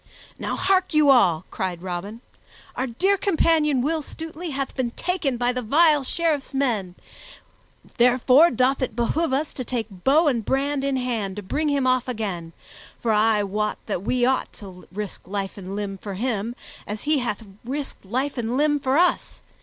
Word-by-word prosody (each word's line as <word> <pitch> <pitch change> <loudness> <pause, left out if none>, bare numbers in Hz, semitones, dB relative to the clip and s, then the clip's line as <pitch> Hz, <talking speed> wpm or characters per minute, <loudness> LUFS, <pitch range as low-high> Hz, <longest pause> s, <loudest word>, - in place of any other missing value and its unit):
"Now - - -2
hark 375 -3 +1
you 300 -2 +6
all!" 180 -10 +4
cried 180 -2 -3
Robin. 190 +5 -5 0.5
"Our 260 - -1
dear 380 +12 +1
companion 315 -8 +2
Will 315 +3 0
Stutely 325 +3 -7
hath 275 -2 -3
been 255 -3 -1
taken 325 -1 -2
by 245 +1 +1
that 250 -2 -4
vile 300 +3 +4
Sheriff's 295 -1 -1
men, 220 -10 0 1.0
therefore 250 +6 +5
doth 255 +1 +1
it 255 - -2
behoove 260 +7 0
us 285 +3 -1
to 255 - -5
take 220 -7 -5
bow 300 +5 +4
and 240 -6 +1
brand 275 +4 0
in 275 -1 0
hand 230 -7 -2
to 210 - -6
bring 300 +10 -1
him 280 -2 +1
off 255 -1 +2
again; 195 -9 -4 0.5
for 230 - 0
I 215 0 +3
wot 210 +2 -1
that 200 -5 -2
we 245 +4 +1
ought 260 +1 +1
to 185 -3 -11
risk 205 -1 -6
life 195 0 -3
and 195 0 -7
limb 200 -2 -4
for 200 -1 -6
him, 230 +1 -2 0.3
as 210 0 -5
he 300 -1 +2
hath 230 -3 -3 0.2
risked 275 +3 -5
life 255 +7 -2
and 235 +2 -1
limb 295 0 +2
for 270 +1 +1
us. 355 +1 +1
250 Hz, 175 wpm, -24 LUFS, 210-290 Hz, 1.0 s, you